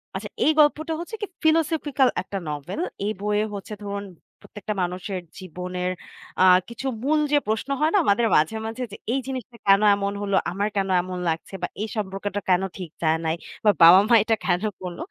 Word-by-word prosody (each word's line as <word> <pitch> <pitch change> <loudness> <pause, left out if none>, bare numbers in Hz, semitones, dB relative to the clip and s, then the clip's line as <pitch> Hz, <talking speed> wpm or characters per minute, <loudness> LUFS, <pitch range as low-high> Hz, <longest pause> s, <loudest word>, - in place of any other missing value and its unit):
আচ্ছা - - -5 0.2
এই 310 - +5
গল্পটা 305 +2 +3
হচ্ছে 350 +6 -6 0.3
ফিলোসফিক্যাল 310 -4 +2
একটা 195 +1 -6
নভেল। 150 - -5 0.3
এই 210 - 0
বইয়ে 210 +1 +1
হচ্ছে 200 +1 -7
ধরুন 200 0 -4 0.4
প্রত্যেকটা 210 0 -6
মানুষের 180 +1 -4 0.2
জীবনের 180 0 -4 0.5
আ - - +7 0.3
কিছু 235 +3 -5 0.2
মূল 305 +3 +2
যে 295 - +5
প্রশ্ন 220 +5 -1
হয় 310 +1 +2
না 410 - +5
আমাদের 215 +4 +3
মাঝে, 155 +8 +2
মাঝে 225 +3 -4
যে 210 - -8 0.2
এই 270 - +1
জিনিসটা 255 -3 -6
কেন 195 +1 +6
এমন 200 0 -2
হলো? 200 -1 0 0.2
আমার 200 +3 -1
কেন 195 -1 0
এমন 185 0 -6
লাগছে 165 +4 -4
বা - - -1
এই 215 - -1
সম্পর্কটা 205 -1 -3
কেন 180 0 +4 0.2
ঠিক 180 -3 -6
যায় 160 0 +2
নাই? 160 0 +1 0.3
বা 210 - +7
বাবা-মা 190 +8 +8
এটা 225 +1 +2
কেন 180 0 +1 0.2
করল? 180 -2 -6
205 Hz, 185 wpm, -24 LUFS, 185-245 Hz, 0.5 s, বাবা-মা